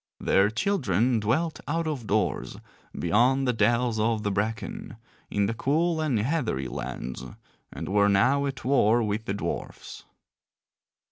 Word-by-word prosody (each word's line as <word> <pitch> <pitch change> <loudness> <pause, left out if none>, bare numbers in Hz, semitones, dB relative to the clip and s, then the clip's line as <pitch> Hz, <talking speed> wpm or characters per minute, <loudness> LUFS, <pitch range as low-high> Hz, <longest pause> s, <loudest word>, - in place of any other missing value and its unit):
Their 100 +2 +3
children 120 - +1
dwelt 150 +10 0
out 165 +2 -1
of 140 -8 -4
doors 100 -8 -1 0.4
beyond 125 +9 +2
the 125 - +2
dells 115 +1 +1
of 110 0 +1
the 105 - 0
bracken, 115 - -3 0.3
in 100 -1 +1
the 110 - -1
cool 160 +7 0
and 145 -7 +1
heathery 110 - -1
lands, 60 +1 -6 0.5
and - - -6
were 100 +1 +3
now 135 +8 +3
at 130 -3 -6
war 120 -3 +3
with 105 +1 -2
the 95 - -2
dwarfs. 85 -4 -6
115 Hz, 140 wpm, -26 LUFS, 105-140 Hz, 0.5 s, Their